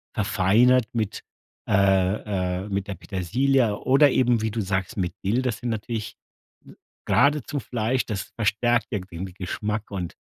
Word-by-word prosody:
verfeinert 110 +4 +3
mit 110 -4 -2 0.4
äh, 95 -1 +1
äh, - - -8
mit 100 0 -2
der 100 - -3
Petersilie 110 +6 +1
oder 140 +2 +5
eben 120 -3 +2
wie 110 - -1
du 110 +1 -2
sagst, 95 -1 -2
mit 90 -2 -1
Dill, 110 +6 +2
das 125 -5 -2
sind 120 - -4
natürlich 110 0 -4 0.5
n - - -15 0.3
geradezu 145 0 +2
Fleisch, 125 0 -1
das 105 -4 -5
verstärkt 115 +3 +1
ja 105 - 0
den 90 -1 -7
Geschmack 105 +4 -4
und 90 -4 -5
105 Hz, 150 wpm, -24 LUFS, 95-120 Hz, 0.5 s, oder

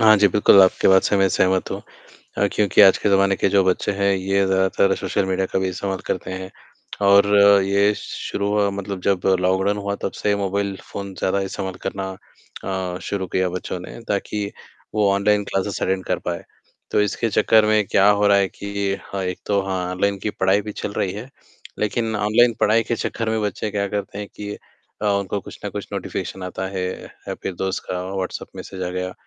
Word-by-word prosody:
हाँ 110 -1 +7
जी। 100 0 +5
बिल्कुल, 100 +1 +6
आपकी 95 - +3
बात 95 0 +6
से 105 - +1
मैं 95 -1 +4
सहमत 95 +1 +1
हूँ - - -4 0.6
अ, - - +3
क्योंकि 105 0 +4
आज 95 -2 +7
के 105 - 0
ज़माने 100 0 +3
के - - +1
जो 100 0 +4
बच्चे 95 +2 +1
हैं, 100 0 +1
ये 95 +1 +1
ज़्यादातर 95 0 +2
सोशल 95 - -1
मीडिया 95 0 0
का - - +2
भी 95 - 0
इस्तेमाल 95 +1 -3
करते 90 0 -3
हैं 95 0 -6 0.6
और 100 0 +7 0.4
ये 100 +2 +3
श - - -8 0.3
शुरू 100 0 -1 0.2
मतलब 100 -1 -5
जब 95 -1 +1 0.2
लॉकडाउन 95 +2 +1
हुआ, 100 0 -2
तब 100 - -4
से 105 -1 0
मोबाइल 100 0 -1 0.2
फ़ोन 100 -1 -6
ज़्यादा 95 +1 +1
इस्तेमाल 95 -1 -4
करना 95 0 -3 0.9
अ, - - -6
शुरू 95 -2 -3
किया 95 +1 0
बच्चों 90 0 -5
ने 90 - -9
ताकि 100 0 -2 0.4
वो 105 -2 +3
ऑनलाइन 105 +1 +2
क्लासेस 95 +1 -2
अटेंड 95 0 0
कर - - -1
पाएँ, - - -2 0.5
तो - - +3
इसके 110 +3 0
चक्कर 110 0 +4
में 105 -1 +3
क्या 100 +1 +4
हो 105 0 +3
रहा 100 0 +5
है 100 - +2
कि 100 0 -3 0.2
हाँ, 95 -1 -3
एक 90 -1 -3
तो 100 -1 +1
हाँ, 95 -2 -3
ऑनलाइन 100 +2 0
की 105 - 0
पढ़ाई 95 +2 +3
भी 105 +1 -6
चल 105 - -5
रही 95 - -1
है, 105 +6 -8 0.5
लेकिन 110 +1 -1
ऑनलाइन 110 +3 +3
पढ़ाई 115 +2 +3
के 115 +1 -1
चक्कर 115 0 -3
में 110 0 0
बच्चे 105 0 -2
क्या 100 -1 -1
करते 100 0 -4
हैं 105 - -5
कि 105 0 -6 0.5
अ, - - -1
उनको 100 -1 0
कुछ - - -11
ना - - -3
कुछ - - -6
नोटिफिकेशन 95 - -4
आता 90 +1 -4
है 90 - -1 0.2
या - - -9
फिर 95 - -3
दोस्त 95 +2 -2
का 90 0 -2
व्हाट्सएप 95 -1 -4
मैसेज 95 -1 -8
आ 90 - -2
गया 90 0 -4
100 Hz, 205 wpm, -21 LUFS, 95-105 Hz, 0.9 s, हाँ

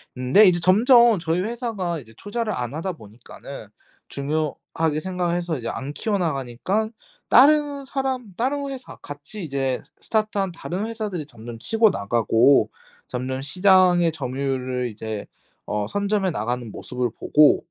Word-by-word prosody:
는데 130 +12 +5
이제 180 -2 +4
점점 235 +5 +6
저희 165 +1 0
회사가 210 -6 -3
이제 115 -4 -15
투자를 215 +1 -3
안 120 0 -4
하다 165 +4 -2
보니까는 110 0 -11 0.4
중요하게 155 +2 -2
생각해서 175 -2 -2
이제 115 -2 -4
안 135 +2 -5
키워 210 +3 -1
나가니깐 165 - -1 0.4
다른 285 +1 +5
사람 260 -6 -3
다른 280 +4 -1
회사 265 -2 -8
같이 145 +8 -9
이제 135 -3 -1 0.2
스타트 215 -1 -1
한 195 -2 0
다른 180 +4 -4
회사들이 215 -8 -4
점점 120 -3 -10
치고 225 - +3
나가고 115 - +3 0.4
점점 130 +1 -3
시장의 180 +2 +4
점유율을 130 -3 -2
이제 110 -1 -6 0.4
어 105 -1 -2
선점해 200 - 0
나가는 120 0 -3
모습을 125 +2 -3
보고 150 0 +5
165 Hz, 310 characters per minute, -23 LUFS, 130-215 Hz, 0.4 s, 점점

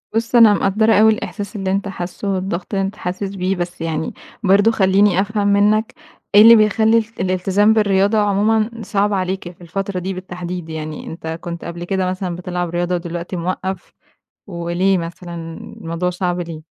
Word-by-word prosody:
بُص 230 +2 0
أنا 225 -3 +8
مقدّرة 215 +3 +2
أوي 220 +1 +6
الإحساس 205 0 -6
اللي 195 -2 -2
أنتَ 200 +1 -1
حاسُّه، 190 +1 -6
والضغط 185 +1 -4
اللي 195 0 +1
أنت 195 +2 -5
حاسس 190 +2 -4
بيه، 185 +1 -1
بس 175 -1 -5
يعني 160 -1 -2 0.3
برضو 200 +3 +4
خلِّيني 190 -2 +3
أفهم 205 0 -1
منك، 210 +2 +2 0.4
إيه 205 - +9
اللي 230 +2 +10
بيخلِّي 220 +1 +4
ال 225 - +1
الالتزام 190 +3 +2
بالرِّياضة 205 0 +2
عُمومًا 210 +2 +2
صعب 205 0 0
عليك 185 -2 -2
في 175 - -22
الفترة 190 +3 -4
دي 190 +2 -4
بالتَّحديد؟ 180 -2 -6
يعني 155 -1 -6
أنتَ 160 0 -8
كُنت 170 -1 -6
قبل 170 0 -6
كده 185 0 -1
مثلًا 185 -1 -3
بتلعب 180 0 -3
رياضة 175 +1 -1
ودلوقتي 170 +1 -5
مِوَقِّّف، 185 +1 -4 0.6
وليه 175 +1 0
مثلًا 170 +1 -7 0.5
الموضوع 170 +2 -2
صعب 180 -1 -2
ليه؟ 165 -2 -6
190 Hz, 170 wpm, -19 LUFS, 175-205 Hz, 0.6 s, اللي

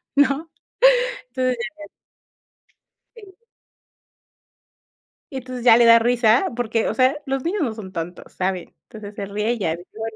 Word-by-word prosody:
¿no? 285 +3 +2 0.8
Entonces, 255 -1 0 1.6
ya 460 - -14
ya. 390 -2 -14
Sí. 465 - -42 1.9
Y 270 - -5
entonces, 255 -1 -7
ya 230 -2 +8
le 240 - +5
da 230 0 +8
risa, 235 - +3
porque, 230 -1 -1
o - - -1
sea, 260 +2 +2
los 270 -1 -2
niños 390 +5 -1
no 245 -7 -1
son 210 -4 -9
tontos, 175 0 -7
saben. 185 -1 -3
Entonces, 210 -2 -11
se 200 - -5
ríe 210 +4 -1
y 240 - -6
ya, 165 -5 -1
dice: 175 +2 -14
"Bueno". 225 0 -5
235 Hz, 160 wpm, -22 LUFS, 210-265 Hz, 1.9 s, ya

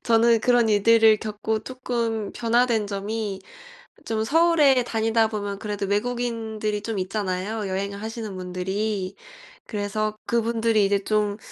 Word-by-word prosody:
저는 230 0 +4
그런 240 -1 +3
일들을 220 +1 +5
겪고 215 +1 -3
쪼끔 235 -4 -3
변화된 235 -2 +1
점이 200 0 -4 0.6
좀 220 -1 -1
서울에 300 -2 +4
다니다 225 -1 +1
보면 205 -2 -4
그래도 205 -1 -3
외국인들이 220 -1 -2
좀 220 -1 -3
있잖아요 195 +2 -2
여행을 200 +1 -3
하시는 220 -2 -5
분들이. 190 +2 -3 0.5
그래서 215 0 -2
그분들이 230 -2 +2
이제 200 0 +1
좀 210 -1 0
220 Hz, 295 characters per minute, -24 LUFS, 205-230 Hz, 0.6 s, 일들을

